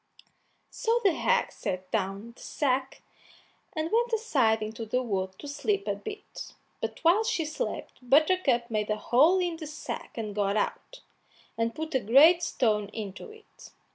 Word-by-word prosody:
So 465 0 +1
the 390 -4 +4
hag 480 +8 +1
set 185 0 -5
down 200 +2 -2
the - - -17
sack, 265 -2 -1 0.7
and 315 -1 -2
went 475 +2 +2
aside 270 - +2
into 220 +2 -5
the 250 +4 -1
wood 190 -4 -3
to 290 - -9
sleep 395 +8 -1
a - - +1
bit, 420 -1 -8 0.3
but - - -3
while 350 +7 +5
she 335 -7 0
slept 310 +12 -5
Buttercup 270 -2 +3
made 215 -1 -1
a 215 - +2
hole 295 - +4
in 350 -3 -1
the 315 -2 -7
sack 300 -4 -7
and 215 -2 -4
got 200 0 0
out, - - -3 0.5
and 230 0 -1
put 315 +1 -5
a 260 - +3
great 290 - +6
stone 215 -10 +1
into 205 - -7
it. 435 0 -15
270 Hz, 165 wpm, -28 LUFS, 215-355 Hz, 0.7 s, great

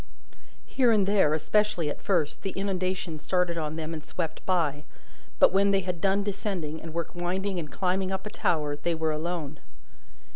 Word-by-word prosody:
Here 250 -3 +3
and 210 -3 +4
there, 195 -7 +4
especially 175 +1 +1
at 145 - -4
first, 170 -7 0
the 195 - -3
inundation 185 -4 -2
started 180 +1 +1
on 155 -2 -2
them 160 0 -4
and 155 -2 -6
swept 165 -1 -4
by; 155 -6 +1 0.5
but - - +6
when 200 +1 +4
they 195 -1 +3
had 180 -2 -4
done 195 +1 +2
descending, 190 -6 -3
and 165 - -7
were 170 +1 -1
winding 185 +2 -1
and 150 -3 -6
climbing 185 0 0
up 190 +1 -3
a 210 - -5
tower, 150 -7 0
they 165 +3 -1
were 160 -1 0
alone. 155 -2 -3
175 Hz, 180 wpm, -28 LUFS, 155-195 Hz, 0.5 s, but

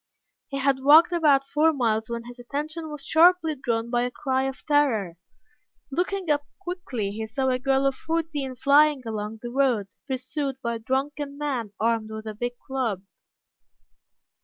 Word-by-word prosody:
He 275 - -4
had 270 0 +2
walked 310 +6 +7
about 295 -6 +3
four 310 +3 +3
miles 225 -6 0
when 235 0 -4
his 245 +1 -11
attention 305 +6 -4
was 295 -2 -8
sharply 330 0 +5
drawn 235 -4 -2
by 240 -1 +2
a 245 - 0
cry 265 +1 -1
of 270 0 -5
terror. 235 - +1 0.7
Looking 365 +5 -1
up 290 0 +1
quickly, 350 - -4
he 220 +2 -5
saw 265 +4 -1
a 255 0 +1
girl 270 +1 +1
of 275 - +3
fourteen 310 -4 -3
flying 285 +1 +4
along 215 0 -5
the 240 - -5
road 245 -7 +1 0.2
pursued 265 +1 -3
by 235 -1 -1
a - - -12
drunken 280 +4 -2
man 260 -8 -3
armed 225 -1 0
with 220 0 -7
a 215 - -5
big 245 +3 -4
club. 240 -8 -2
265 Hz, 165 wpm, -25 LUFS, 235-295 Hz, 0.7 s, walked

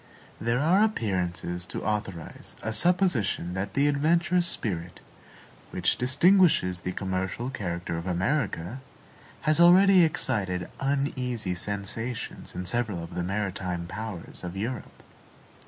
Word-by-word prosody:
There 115 +1 0
are 180 +7 +4
appearances 90 - -1
to - - -5
authorize 100 -6 -2
a 110 - -2
supposition 120 - +2
that 95 +1 -4
the 140 +1 +3
adventurous 170 +4 +2
spirit, 90 - -3 0.7
which - - +1
distinguishes 135 - +4
the 90 - -3
commercial 95 +6 -3
character 85 -7 -3
of 85 - -7
America, 100 - -1 0.6
has 155 +1 +3
already 185 +2 +7
excited 100 - 0
uneasy 130 -7 -1
sensations 105 +6 -4
in 90 - -4
several 105 -5 -1
of 85 - -9
the - - -2
maritime 95 -2 -2
powers 95 -1 -7
of 90 +1 -5
Europe. 115 +4 -5
105 Hz, 120 wpm, -27 LUFS, 90-140 Hz, 0.7 s, already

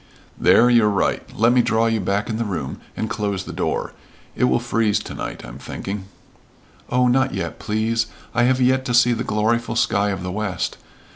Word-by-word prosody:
"There 120 - +5
you're 120 -3 +5
right. 100 -2 +1 0.2
Let 115 +3 +4
me 125 - +5
draw 115 -1 +2
you 115 -1 +1
back 100 +2 -1
in 110 - -2
the 115 - 0
room 90 -11 -4 0.2
and 110 - -1
close 100 -3 -2
the - - -8
door. - - -2 0.4
It - - +2
will 65 0 +3
freeze 110 -3 +1
to - - -6
night, - - -6
I'm - - -10
thinking." 95 +7 -6 0.8
"Oh, 125 0 +3
not 135 +1 +2
yet, 85 -4 -4
please! 110 +1 0 0.3
I 120 0 +3
have 130 +1 +2
yet 130 +1 +3
to 120 - 0
see 120 0 +5
the - - -2
gloryful 115 +2 0
sky 100 +1 +2
of 95 -3 -3
the 90 - -3
west. 100 -1 -3
110 Hz, 200 wpm, -21 LUFS, 100-120 Hz, 0.8 s, There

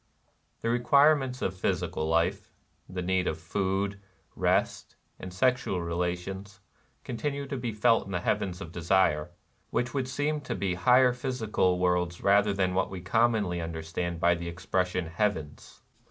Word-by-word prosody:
The 115 - -1
requirements 135 +2 +3
of 95 - -1
physical 80 -3 -1
life 85 +1 0 0.2
— - - -41
the 90 -1 -4
need 95 0 +1
of 80 - -1
food, 100 +3 -1 0.4
rest, - - 0 0.2
and 95 - -7
sexual 125 -1 +1
relations 90 +4 -3 0.2
— 65 +1 -39
continue 140 +4 -3
to 140 - -5
be 120 -3 -3
felt 110 0 +2
in - - -7
the 90 -2 -1
Heavens 90 +1 -1
of 80 - -7
Desire, 85 -3 +2 0.2
— - - -41
which 120 0 -1
would 135 -2 -1
seem 145 +3 -1
to - - -4
be 95 -2 -1
higher 125 +7 +4
physical 115 -8 0
worlds 90 -1 0
rather 100 +1 +4
than 95 -2 0
what 95 - +1
we 95 - -6
commonly 105 -2 +1
under 80 -1 -5
stand 85 +1 -3
by 85 0 +4
the 85 0 -5
expression 90 +1 -1
"heavens." 80 -3 -3
95 Hz, 165 wpm, -28 LUFS, 85-120 Hz, 0.4 s, higher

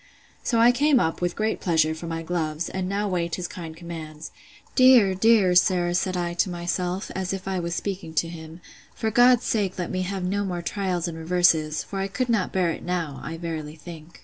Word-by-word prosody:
So 235 - 0
I 235 +1 +7
came 280 +2 +3
up, 160 -5 -1
with 175 0 -1
great 215 +1 -1
pleasure, 160 -4 +2
for 160 +2 -7
my 165 0 -4
gloves: 160 -1 -2
and 185 -1 -3
now 205 +1 -1
wait 170 -3 -1
his 180 -1 -4
kind 165 -4 -8
commands. 160 -2 -8 0.4
Dear, 255 -7 +6
dear 200 -2 +4
sir! 180 -1 +3
said 185 +1 0
I 175 -1 -2
to 180 +3 +1
myself, 175 +2 -3
as 190 0 -2
if 195 0 -6
I 190 -1 -1
was 170 0 -3
speaking 190 -5 -4
to 165 - +1
him, 165 0 -10 0.3
for 220 - -1
God's 245 +1 +5
sake 200 -4 -1
let 175 -2 -3
me 185 - -1
have 190 0 -3
no 200 +3 0
more 175 -3 -3
trials 185 -2 -2
and 170 - -5
reverses; 160 -2 +2
for 195 - -6
I 195 - -1
could 250 +5 -2
not 220 -6 +1
bear 180 -3 +1
it - - -6
now, 170 -5 -3
I 165 +3 -5
verily 160 -2 -5
think! 165 0 -12
180 Hz, 215 wpm, -25 LUFS, 165-195 Hz, 0.4 s, I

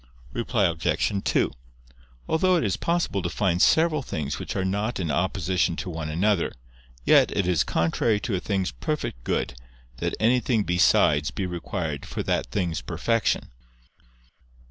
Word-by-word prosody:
Reply 115 -3 +1
Obj. 85 +4 0
2: - - +1 0.8
Although 185 +3 +3
it 170 - +1
is 100 -5 0
possible 170 - 0
to 90 - -2
find 90 -3 0
several 160 -2 +4
things 80 - -4
which - - -5
are 95 -1 0
not 105 +5 -1
in 85 -5 -1
opposition 90 0 0
to 95 0 -5
one 80 -1 -4
another, 90 +3 +1 0.5
yet - - +6
it 100 - +2
is 90 -5 +2
contrary 105 +6 +1
to 115 - -3
a 95 - +1
thing's 95 -3 -1
perfect 150 - -4
good, - - -1 0.4
that - - -2
anything 120 -1 +2
besides 75 -4 +3
be 95 - -3
required 85 -4 -4
for - - -4
that - - 0
thing's 85 +4 -2
perfection. 110 +7 0
95 Hz, 150 wpm, -25 LUFS, 85-110 Hz, 0.8 s, yet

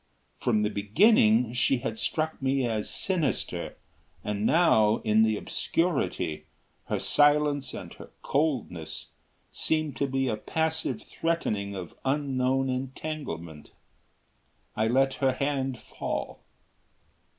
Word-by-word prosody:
From 110 -3 +1
the 105 - 0
beginning 110 - +4
she 125 +2 +2
had 115 -2 -4
struck 160 -1 -1
me 135 -1 +1
as 110 -3 -1
sinister 170 -9 -1 0.5
and 105 +1 -1
now, 110 -11 +4
in 110 0 +4
the 110 -1 +3
obscurity, 165 - -1 0.4
her - - -1
silence 145 -1 +2
and - - -8
her - - -12
coldness 130 - -2 0.4
seemed 155 -3 0
to 140 - 0
be 135 0 0
a 110 - -1
passive 160 +7 -1
threatening 105 -12 -2
of 90 -3 -7
unknown 135 -1 +1
entanglement. 130 - -5 1.1
I 110 - +1
let 135 +3 +3
her 135 -1 +3
hand 135 -1 -1
fall. - - -5
130 Hz, 115 wpm, -28 LUFS, 110-145 Hz, 1.1 s, beginning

